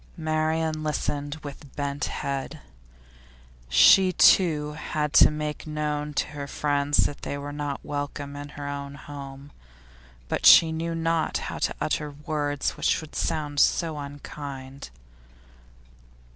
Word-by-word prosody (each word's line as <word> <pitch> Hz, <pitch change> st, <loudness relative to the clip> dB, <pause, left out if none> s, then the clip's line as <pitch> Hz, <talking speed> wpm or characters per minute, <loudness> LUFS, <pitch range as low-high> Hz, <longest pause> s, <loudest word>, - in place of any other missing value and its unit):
Marian 155 Hz, 0 st, 0 dB
listened 145 Hz, -1 st, -2 dB
with 145 Hz, -1 st, -10 dB
bent 140 Hz, 0 st, -2 dB
head. 140 Hz, -1 st, -4 dB, 1.1 s
She 70 Hz, -, +7 dB
too 155 Hz, -5 st, +4 dB
had 150 Hz, 0 st, -3 dB
to -, -, +8 dB
make 150 Hz, 0 st, -4 dB
known 150 Hz, -1 st, -3 dB
to -, -, +1 dB
her 145 Hz, -1 st, -6 dB
friends 145 Hz, 0 st, +1 dB
that 145 Hz, -, -4 dB
they 140 Hz, -, -4 dB
were 145 Hz, +1 st, -6 dB
not 145 Hz, -1 st, -4 dB
welcome 145 Hz, 0 st, -4 dB
in 145 Hz, 0 st, -7 dB
her 145 Hz, -1 st, -5 dB
own 140 Hz, 0 st, -5 dB
home; 140 Hz, -1 st, -10 dB, 0.8 s
but -, -, -2 dB
she 165 Hz, -1 st, +9 dB
knew 165 Hz, +1 st, -3 dB
not 165 Hz, -1 st, 0 dB
how -, -, -5 dB
to -, -, -1 dB
utter 150 Hz, -, -1 dB
words 145 Hz, -1 st, -2 dB
which -, -, 0 dB
would 155 Hz, -2 st, -11 dB
sound 150 Hz, -3 st, -1 dB
so 160 Hz, -1 st, +2 dB
unkind. 140 Hz, -1 st, -8 dB
145 Hz, 130 wpm, -26 LUFS, 140-155 Hz, 1.1 s, she